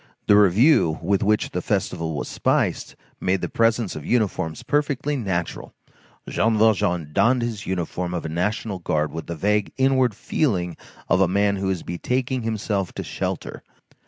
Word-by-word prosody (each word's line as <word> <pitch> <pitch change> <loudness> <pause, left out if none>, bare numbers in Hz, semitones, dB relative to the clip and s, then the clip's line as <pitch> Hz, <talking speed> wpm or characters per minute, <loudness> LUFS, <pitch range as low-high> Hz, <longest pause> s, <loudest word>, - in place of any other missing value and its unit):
The 105 - +5
review 105 - +5
with 100 -1 +1
which 105 +1 +1
the 90 - -2
festival 85 -6 -2
was - - -3
spiced - - 0 0.2
made 95 0 0
the - - -1
presence 115 -2 +1
of 75 - -6
uniforms 100 -9 -1
perfectly 145 0 0
natural; 95 -9 -3 0.5
Jean 110 -1 +1
Valjean 90 -8 +2
donned 120 +5 +3
his 115 -4 -4
uniform 90 -1 -2
of 85 - -4
a - - -3
national 95 +4 -2
guard 75 -3 -1
with 80 0 -6
the 85 - -4
vague 105 +5 0
inward 130 -4 +3
feeling 90 - -1 0.3
of - - +3
a 95 - +5
man 100 +2 +1
who 95 0 -1
is 95 -3 -2
betaking 125 +8 -2
himself 105 -4 -2
to - - -5
shelter. - - -4
100 Hz, 160 wpm, -23 LUFS, 90-115 Hz, 0.5 s, The